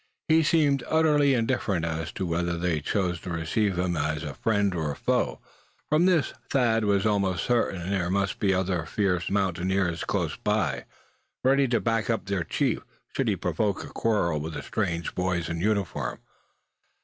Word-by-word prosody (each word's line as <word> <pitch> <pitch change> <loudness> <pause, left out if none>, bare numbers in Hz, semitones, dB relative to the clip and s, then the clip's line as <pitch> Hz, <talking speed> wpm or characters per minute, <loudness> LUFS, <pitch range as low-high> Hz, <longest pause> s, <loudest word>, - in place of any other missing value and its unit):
He 160 +1 +5
seemed 145 -4 +3
utterly 150 -3 +4
indifferent 115 -7 0
as 80 -1 -3
to 95 - -3
whether 85 0 -1
they 85 -3 0
chose 90 0 -1
to 90 - -7
receive 85 +4 0
him 90 -1 0
either 75 -1 0
as 75 - -6
a - - -5
friend 100 -3 +1
or 80 -4 -1
a - - -5
foe. - - 0 0.5
From 155 +4 +4
this 175 -6 +2 0.2
Thad 115 -5 +2
was 100 0 +2
almost 100 -4 +1
certain 115 -7 +1
that 85 - -5
there 90 -3 0
must 100 +1 0
be 100 -3 +2
other 90 -3 0
fierce 90 -3 0
mountaineers 95 -2 0
close - - -1
by, - - 0 0.6
ready 135 +1 +4
to 120 -1 +2
back 115 -1 0
up 115 -3 0
their 100 -3 -1
chief, - - 0 0.3
should - - 0
he - - +2
provoke 100 -3 -1
a - - -9
quarrel 95 -9 0
with 80 +2 -5
the - - -5
strange 85 -6 -2
boys 90 -2 -1
in 85 0 -3
uniform. 100 -2 -1
95 Hz, 180 wpm, -27 LUFS, 85-115 Hz, 0.6 s, He